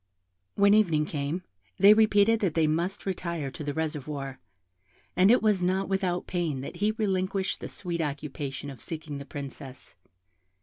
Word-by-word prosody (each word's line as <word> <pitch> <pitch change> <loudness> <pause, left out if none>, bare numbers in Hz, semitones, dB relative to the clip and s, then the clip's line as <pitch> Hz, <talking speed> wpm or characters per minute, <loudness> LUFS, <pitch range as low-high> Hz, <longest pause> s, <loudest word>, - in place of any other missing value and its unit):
When 200 0 +5
evening 165 -8 +3
came, 150 +4 -3 0.3
they 200 +2 +8
repeated 215 0 +4
that 185 -7 0
they 165 -1 +3
must 170 +6 -1
retire 170 -6 -3
to 150 - -7
the 145 - -2
reservoir, 150 -3 -4 0.8
and 185 +2 +5
it 245 0 +5
was 210 -4 +3
not 190 +2 0
without 185 -2 0
pain 165 -7 -2
that 140 - -7
he 205 +4 +2
relinquished 195 -2 -1
the - - -6
sweet 170 -3 -4
occupation 145 -1 -4
of 130 - -12
seeking 155 -3 -6
the 140 - -9
Princess. 140 -2 -9
170 Hz, 160 wpm, -28 LUFS, 145-195 Hz, 0.8 s, they